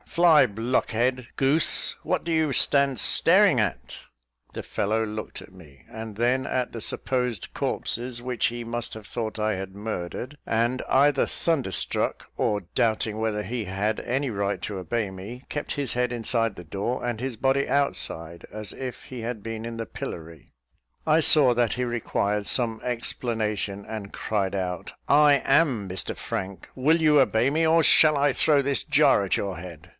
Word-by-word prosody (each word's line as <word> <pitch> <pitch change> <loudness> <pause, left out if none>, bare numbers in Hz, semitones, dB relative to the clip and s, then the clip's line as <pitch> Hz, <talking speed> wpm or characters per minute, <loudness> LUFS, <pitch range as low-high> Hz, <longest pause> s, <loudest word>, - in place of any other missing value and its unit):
Fly, 165 -4 +5
blockhead, 120 +2 -1
goose, 140 +4 +4
what - - -1
do 170 - -1
you 160 -2 +2
stand 140 0 +2
staring 180 - +5
at?" 105 -5 -4 0.5
The - - -6
fellow 110 +2 -1
looked 110 0 -6
at 95 - -15
me, 75 -7 -17
and 110 -2 -8
then 125 +3 +1
at 125 -1 -2
the 115 - -6
supposed 125 -5 -2
corpses, 120 +1 -2
which 125 -1 0
he 120 0 -5
must 120 0 -4
have 110 -1 -10
thought 110 -2 -4
I 110 -1 0
had 95 0 -6
murdered; 105 +6 -5
and, 120 +3 0
either 140 +1 +4
thunderstruck, 140 - -1
or 105 -1 0
doubting 110 -1 0
whether 110 -1 -1
he 115 +3 -4
had 100 +3 -2
any 135 +3 -1
right 100 -3 -2
to 100 -2 -4
obey 100 +3 -2
me, 105 +8 -9
kept 150 - -4
his 140 -2 -3
head 125 0 0
inside 115 -2 0
the 90 - -10
door 105 +9 -3
and 120 -2 -3
his 130 -3 -4
body 135 +3 +1
outside, 85 - 0
as 105 -1 -6
if 130 -2 -7
he 125 -2 -8
had 115 -1 -4
been 115 +1 -6
in 115 0 -6
the 115 - -4
pillory. 80 -6 -8 0.6
I 155 +1 +4
saw 145 -5 +6
that 120 -2 +1
he 125 +1 -2
required 105 -3 -1
some 115 -3 +1
explanation, 110 -4 -3
and 105 -3 -6
cried 100 -3 -2
out, 90 -2 -4 0.2
"I 145 0 +6
am 135 -8 +2
Mr 95 0 -3
Frank; 95 -2 -5
will 155 +6 +3
you 150 -3 +5
obey 120 +1 +2
me, 160 +3 +1
or 165 +1 +4
shall 155 -1 +5
I 140 -1 +2
throw 145 0 +3
this 140 0 0
jar 140 -8 +4
at 95 - 0
your 100 -2 -3
head?" 85 -1 -10
115 Hz, 170 wpm, -25 LUFS, 105-135 Hz, 0.6 s, saw